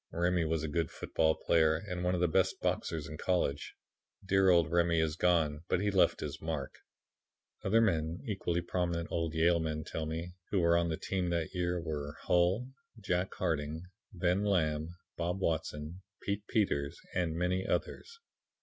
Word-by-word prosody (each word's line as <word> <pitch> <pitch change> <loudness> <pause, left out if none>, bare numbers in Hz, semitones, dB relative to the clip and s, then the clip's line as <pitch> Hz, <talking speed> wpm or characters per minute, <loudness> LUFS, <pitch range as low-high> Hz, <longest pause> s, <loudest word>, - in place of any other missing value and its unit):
"Remy 85 0 +1
was 80 -1 0
a - - -1
good 80 +1 -1
football 80 -1 +1
player 80 -1 +3
and 90 0 -4
one 90 0 +1
of 90 - -1
the 90 - +4
best 80 - +1
boxers 80 -3 -1
in 75 - -7
college. 85 -6 0 0.5
Dear 95 0 +4
Old 85 -2 +4
Remy 85 -1 +3
is 80 -1 +1
gone, 80 -4 +2
but 90 - +1
he 105 +1 +1
left 95 -2 +3
his - - -5
mark." 80 -4 -3 0.9
Other 110 +4 +4
men, 85 -6 +1
equally 90 -5 -1
prominent 85 -1 -2
old 80 -1 -1
Yale 85 +1 +4
men 80 -1 -2
tell 80 0 -4
me, 85 +2 -4 0.2
who 100 - +1
were 85 -1 +4
on 85 0 +2
the 80 - -1
team 95 -2 -2
that 85 -1 -1
year 90 -1 0
were 75 -3 -4
Hull, 95 +9 +2 0.3
Jack 95 -3 -1
Harding, 80 -2 -2 0.3
Ben 90 +1 +1
Lamb, 80 -6 +1 0.3
Bob 90 +3 -1
Watson, 80 -1 -2 0.2
Pete 100 +1 -3
Peters 75 -11 0
and 85 -3 0
many 90 +2 0
others. 465 0 -2
85 Hz, 170 wpm, -32 LUFS, 80-90 Hz, 0.9 s, the